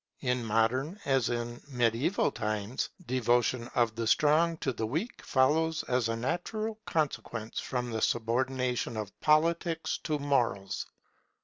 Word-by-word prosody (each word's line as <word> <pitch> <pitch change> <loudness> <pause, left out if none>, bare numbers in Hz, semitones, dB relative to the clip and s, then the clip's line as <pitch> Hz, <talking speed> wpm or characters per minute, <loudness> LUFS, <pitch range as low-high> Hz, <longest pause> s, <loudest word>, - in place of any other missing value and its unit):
In 125 -2 0
modern 120 - +1
as 135 -4 +2
in 120 0 -3
mediaeval 125 - +1
times, 105 +1 -2 0.2
devotion 120 -1 +1
of 120 -2 +3
the 115 0 -2
strong 160 +6 +4
to 135 -4 -1
the 110 -1 -2
weak 160 - -3
follows 155 +5 +2
as 125 -2 0
a 115 - 0
natural 215 - -2
consequence 120 -8 -2
from 125 -2 -3
the 110 -1 -2
subordination 125 0 0
of 105 -2 -4
Politics 165 +2 +2
to 155 -2 0
Morals. 125 -9 0
125 Hz, 130 wpm, -30 LUFS, 115-155 Hz, 0.2 s, strong